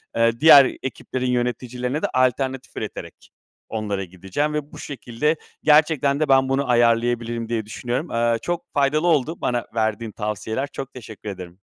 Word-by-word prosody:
eee, 115 0 +2
diğer 145 -3 +9 0.2
ekiplerin 130 0 -3
yöneticilerine 125 +3 -2
de - - +1
alternatif 130 +1 0
üreterek - - -7 0.4
onlara 105 -3 -2
gideceğim 95 - -3
ve 150 -1 -3
bu - - -11
şekilde 140 +2 -2 0.3
gerçekten 150 -2 +4
de 155 -2 0
"Ben 135 0 +4
bunu 135 0 0
ayarlayabilirim." 120 -1 +2
diye 115 -2 -1
düşünüyorum. 125 +7 -3
Eee, 115 0 +2
çok 175 -1 -4
faydalı 145 +4 +2
oldu 160 0 +1
bana 120 -1 -1
verdiğin 110 0 -1
tavsiyeler. 110 +5 -3
Çok 135 -1 -6
teşekkür 110 -4 -9
ederim. 90 -2 -9
125 Hz, 150 wpm, -22 LUFS, 115-140 Hz, 0.4 s, diğer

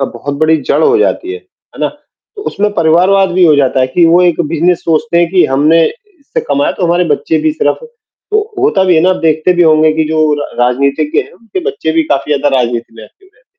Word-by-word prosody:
अ, - - +1
बहुत 135 +3 -6
बड़ी 160 0 +3
जड़ - - +2
हो 440 -1 +3
जाती 370 -4 -1
है, 430 - -6
है 385 -3 -19
ना? - - 0 0.5
तो 410 - -7
उसमें 210 +1 -1
परिवारवाद 180 +4 +2
भी 185 -1 +3
हो 155 - +5
जाता 135 -2 +1
है 130 - +2
कि 175 - +4
वो 170 +2 +4
एक 175 -1 +1
बिजनेस 170 +2 +1
सोचते 170 +3 0
हैं 170 -1 +2
कि 185 -2 +3
हमने 150 +5 +2
इससे 410 - -7
कमाया 140 0 0
तो 185 - -4
हमारे 175 +1 +1
बच्चे 160 +2 -2
भी 155 - +2
सिर्फ 145 -2 -1 0.5
तो 425 - +2 0.2
होता 385 - +1
भी 180 -2 +3
है 160 - +3
ना 185 - +3
अब 185 - -2
देखते 160 +2 +1
भी 175 - +2
होंगे 155 -1 +3
कि 160 0 0
जो 160 - -1 0.2
र - - -5
राजनीतिज्ञ 140 +5 0
हैं, - - -11
उनके 195 -1 -7
बच्चे 160 - -3
भी 165 0 +2
काफ़ी 140 +2 -1
ज़्यादा 140 -1 0
राजनीति 120 -2 -3
में 110 - -12
एक्टिव 380 - -22
रहते 415 - -36
हैं। - - -33
165 Hz, 245 wpm, -12 LUFS, 145-190 Hz, 0.5 s, हो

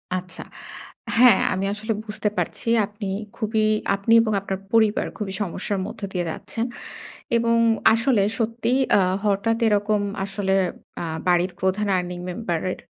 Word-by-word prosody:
আচ্ছা। 185 0 -6 0.7
হ্যাঁ 245 -5 +7
আমি 190 +1 -1
আসলে 220 +2 -2
বুঝতে 210 -1 -2
পারছি - - -3 0.2
আপনি 205 0 -7 0.3
খুবই 220 -1 0 0.3
আপনি 200 +3 +1
এবং 220 -1 0
আপনার 195 -1 -4
পরিবার 220 -1 +3
খুবই 200 -3 -4
সমস্যার 195 +1 -2
মধ্য 220 - -9
দিয়ে 175 -1 -1
যাচ্ছেন 230 +7 -4 0.7
এবং 230 0 +2 0.4
আসলে 230 -3 +2
সত্যি 230 +2 -1 0.2
আ - - +5 0.3
হঠাৎ 210 +3 +1
এরকম 210 0 +2 0.2
আসলে 195 -1 -1 0.5
আ - - -3 0.2
বাড়ির 180 +1 +3
প্রধান 190 +3 0
earning 180 0 -3
member 175 -4 -3
এর - - -6
205 Hz, 140 wpm, -23 LUFS, 190-225 Hz, 0.7 s, হ্যাঁ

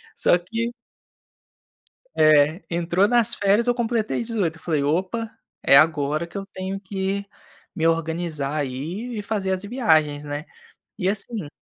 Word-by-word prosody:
só - - +4
que 230 +7 -3 1.4
É, 155 +3 +4
entrou 175 +4 +2
nas 240 -3 +3
férias, 205 +4 +2
eu 245 - +3
completei 235 -1 -1
18, 200 -9 -2
eu - - -20
falei: 155 -4 0
"Opa, 190 +10 -1 0.3
é - - +6
agora 155 +1 +3
que 170 - -12
eu 195 0 -4
tenho 190 0 -5
que 195 0 -3 0.5
me 165 -1 0
organizar, 165 -3 -1
aí, 160 - -4
e 210 - -3
fazer 200 -2 -2
as 185 - -1
viagens, 155 - +2
né". 145 +1 -5 0.5
E 185 - -1
assim 200 -3 -3
185 Hz, 145 wpm, -23 LUFS, 155-210 Hz, 1.4 s, é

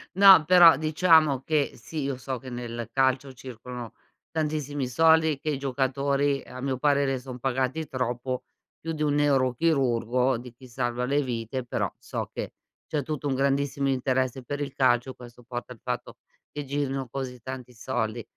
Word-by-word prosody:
No, 190 -4 +8
però 170 -3 +8
diciamo 155 -2 +4
che, 150 -3 +1
sì, 150 +6 -6
io 135 -2 -2
so 130 0 -4
che 130 +1 -10
nel 120 -1 -5
calcio 135 0 +1
circolano 125 -1 -8 0.4
tantissimi 150 -4 -2
soldi, 160 +2 +4
che 155 - -3
i 145 - 0
giocatori, 140 +1 0
a 130 - -9
mio 135 -1 -1
parere, 140 -1 +2
son 125 0 -8
pagati 135 +4 -1
troppo 125 0 -3 0.4
più 165 - -5
di 155 - -6
un 145 -1 +2
neurochirurgo, 130 -3 +2
di 120 0 -10
chi 130 +2 -15
salva 120 0 -2
le 140 +3 +1
vite 120 +1 -3
però - - -2
so - - -5
che - - -5 0.3
c'è 150 - -2
tutto 150 0 -4
un 140 - 0
grandissimo 140 +1 0
interesse 130 -1 0
per 145 +3 -4
il 140 -2 -4
calcio, 130 -1 +2
questo 120 0 -13
porta 120 +1 -6
il 115 - -19
fatto 125 -1 -5 0.3
che 145 - -5
girino 135 -1 -2
così 125 -1 -5
tanti 125 0 -7
soldi. 115 -1 -3
130 Hz, 165 wpm, -26 LUFS, 125-145 Hz, 0.4 s, No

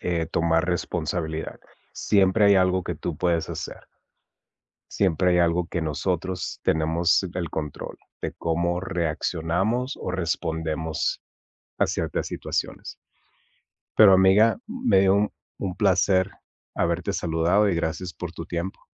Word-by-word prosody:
Eh, 85 -2 -1
tomar 80 0 +1
responsabilidad. 80 -2 -3 0.3
Siempre 100 +1 +3
hay 100 - +6
algo 95 0 +2
que 90 - -3
tú 80 +1 -5
puedes 85 0 0
hacer. - - -7 1.1
Siempre 90 -2 +2
hay 90 - +3
algo 85 0 +2
que 85 - -2
nosotros 90 +3 -2
tenemos 80 +3 +2
el 85 -3 -2
control 75 -3 -5 0.2
de - - -3
cómo 85 +2 -1
reaccionamos, 90 - -1
o - - -5
respondemos 80 -3 -2 0.6
a - - +4
ciertas - - -2
situaciones. - - -4 1.0
Pero 105 -3 +8
amiga, 95 - +5
me 245 - +2
dio 95 0 +4
un 105 +1 +1 0.3
un 90 -2 -3
placer 95 -2 +3 0.4
haberte 90 +4 0
saludado, 85 +4 +2
y 95 - +1
gracias 85 +2 -3
por 90 -1 -6
tu 85 - -8
tiempo. 85 +2 -4
90 Hz, 125 wpm, -25 LUFS, 80-95 Hz, 1.1 s, Pero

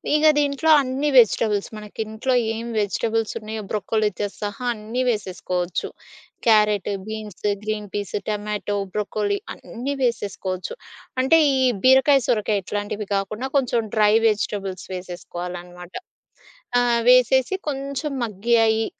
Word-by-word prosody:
ఇగ 305 - +2 0.2
దీంట్లో 285 +2 +1
అన్ని 270 +3 -1
వెజిటబుల్స్ 215 -3 +4
మనకింట్లో 220 +4 -3 0.2
ఏం 230 +1 -5
వెజిటబుల్సున్నాయో 220 +1 -2
బ్రొకొలీతో 210 -1 -1
సహా 205 +4 -4
అన్నీ 225 +4 -4
వేసేసుకోవచ్చు. 185 -4 -2 0.6
Carrot, 210 -3 +4 0.2
beans, 215 -3 -5 0.2
green 210 -1 -3
peas, 205 -1 -4
tomato, 210 -1 -2 0.2
broccoli 210 -1 -1 0.2
అన్నీ 255 +4 -5
వేసేసుకోవచ్చు. 200 - -2 0.5
అంటే 265 +6 +5 0.2
ఈ - - +1 0.3
బీరకాయ, 265 +2 +6
సొరకాయ 210 -2 +1
ఇట్లాంటివి 205 +1 -4
కాకుండా 210 +6 -2
కొంచెం 250 -3 +2 0.2
డ్రై 210 -1 +4
వెజిటబుల్స్ 200 -3 -2
వేసేసుకోవాలనమాట. 180 0 -7 0.8
ఆహ్, 240 -1 +3
వేసేసి 255 +6 +5
కొంచెం 280 +1 -3
మగ్గి 230 +2 0
అయి, 220 0 +2
215 Hz, 105 wpm, -23 LUFS, 205-245 Hz, 0.8 s, బీరకాయ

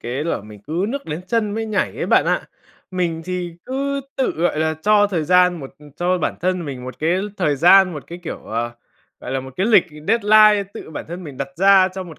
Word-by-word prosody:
cái 130 +6 -4
là 170 - -1
mình 105 -1 -13
cứ 170 +5 -1
nước 280 +4 -4
đến 155 +1 -4
chân 225 0 0
mới 225 0 -3
nhảy 215 -2 -1
ấy - - -3
bạn - - +4
ạ. - - +1 0.5
Mình 170 -3 -2
thì 180 -2 -4
cứ 275 +2 -2 0.2
tự, 265 - +1
gọi 165 -1 0
là, 160 0 +1
cho 210 0 +4
thời 170 -6 -2
gian 180 0 +3
một 135 - -8 0.3
cho 180 +1 +1
bản 160 - -1
thân 180 0 -1
mình 130 -4 -6
một 130 - -8
cái 165 +4 +1 0.2
thời 150 -6 +1
gian, 180 +3 +6
một 150 - -7
cái 170 - -8
kiểu, 170 - -5
ờ, 115 +2 -3 0.5
gọi - - -7
là 135 - -1
một 130 0 -10
cái 190 - +1
lịch 215 -6 +5 0.2
deadline 215 -1 +5
tự - - -9
bản 155 - -6
thân 175 +1 -7
mình 145 -3 -9
đặt 135 +1 -4
ra 195 0 +5
cho 190 - -4
một 165 -4 -12
180 Hz, 235 wpm, -20 LUFS, 155-200 Hz, 0.5 s, gian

